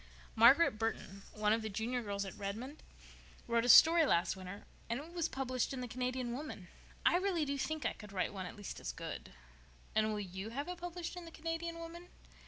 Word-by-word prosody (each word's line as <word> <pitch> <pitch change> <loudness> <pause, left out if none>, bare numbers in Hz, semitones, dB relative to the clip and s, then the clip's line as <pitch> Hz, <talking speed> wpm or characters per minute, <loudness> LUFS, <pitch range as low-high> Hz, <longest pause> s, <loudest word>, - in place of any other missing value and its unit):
"Margaret 235 +1 +6
Burton, 225 -3 -3
one 210 0 +2
of 225 - +1
the 220 - -3
Junior 225 +5 -2
girls 200 -2 -3
at 190 - -6
Redmond, 225 +9 -5 0.7
wrote 235 0 +2
a - - +1
story 330 +5 +9
last 175 - +2
winter 190 +1 -8 0.2
and 235 +2 0
it 320 +4 -10
was 335 -2 0
published 255 -1 -1
in 260 - -4
the 250 - -4
Canadian 250 0 -2
Woman. 250 - -6 0.4
I 350 - +6
really 360 -4 +1
do 280 0 -1
think 305 0 -2
I - - +1
could 210 -2 -12
write 190 0 -1
one 190 -2 -4
at - - -9
least 205 -1 -7
as - - -4
good." - - -7 0.6
"And 215 0 +3
will 210 -1 -1
you 190 +1 -5
have 280 +7 -4
it 360 -1 -5
published 350 0 -5
in 355 -1 -7
the 330 - -10
_Canadian 330 +1 -3
Woman? 335 +1 -8
250 Hz, 210 wpm, -35 LUFS, 210-325 Hz, 0.7 s, story